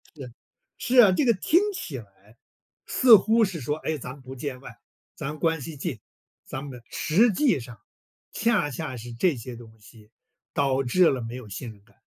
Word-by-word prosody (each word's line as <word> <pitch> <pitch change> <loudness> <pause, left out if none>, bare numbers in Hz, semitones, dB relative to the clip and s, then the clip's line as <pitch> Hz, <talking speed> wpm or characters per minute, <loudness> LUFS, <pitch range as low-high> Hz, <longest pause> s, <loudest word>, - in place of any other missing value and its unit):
是， 130 -5 -9 0.5
是 255 0 -1
啊， 205 -5 +6
这 270 - +1
个 235 - +5
听 310 - +3
起 150 - -5
来 105 +1 -16 0.5
似 250 -4 +7
乎 220 +3 +4
是 175 -6 -5
说， 150 +5 -2
哎， 160 -1 -3
咱 125 -1 -7
们 140 - -15
不 130 +1 -10
见 130 -1 -5
外， - - -12 0.4
咱 150 +2 -6
关 165 -3 0
系 160 +3 -7
近， 135 - -4 0.4
咱 130 - -6
们 125 -4 -9
实 215 +9 +3
际 255 - +2
上 120 -3 -11 0.5
恰 215 -10 +1
恰 135 -1 -5
是 120 +1 -9
这 145 +6 +1
些 120 +1 -8
东 115 -1 -14
西， 105 0 -18 0.4
导 135 -1 +1
致 170 +8 +4
了 130 -2 -1
没 115 +2 -6
有 120 -5 -9
信 115 +4 -6
任 100 -2 -18
感。 105 -2 -28
135 Hz, 210 characters per minute, -25 LUFS, 120-180 Hz, 0.5 s, 似